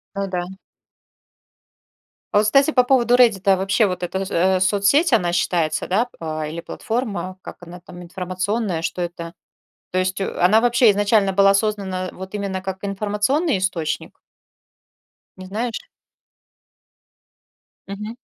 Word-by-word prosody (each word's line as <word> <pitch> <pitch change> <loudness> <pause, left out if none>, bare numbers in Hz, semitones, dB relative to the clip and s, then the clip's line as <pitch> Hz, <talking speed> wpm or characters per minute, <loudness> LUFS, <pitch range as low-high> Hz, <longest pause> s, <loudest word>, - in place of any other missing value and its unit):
Ну 200 0 -2
да. 180 -2 -3 1.9
А - - +4
вот, 210 - +2
кстати, 275 +7 +4
по 250 -4 +4
поводу 245 -1 +3
"Реддита", 200 -6 +4
вообще 195 +4 +2
вот 180 -1 -4
эта, 185 +2 -3
э, 185 +2 +2
соцсеть, 205 - +3
она 175 -6 +2
считается, 170 -3 0
да, 215 +7 +1
э, 155 -1 -4
или 165 +2 -6
платформа? 215 -3 -4
Как - - -10
она 175 +1 -10
там, 175 0 -12
информационная, 185 +1 -3
что 180 - -3
это? 170 -1 -5 0.6
То 185 - 0
есть, 185 +1 -1
э, 195 - -2
она 205 +5 +5
вообще 240 -1 +4
изначально 205 -1 +2
была 195 +1 +5
создана 195 -3 -1
вот 190 +1 -10
именно 195 -2 -3
как 190 0 -5
информационный 210 - 0
источник? 185 -4 -3 1.2
Не 185 0 -10
знаешь? 225 +4 -4 2.0
Мгм. 210 +3 -7
195 Hz, 135 wpm, -21 LUFS, 180-215 Hz, 2.0 s, она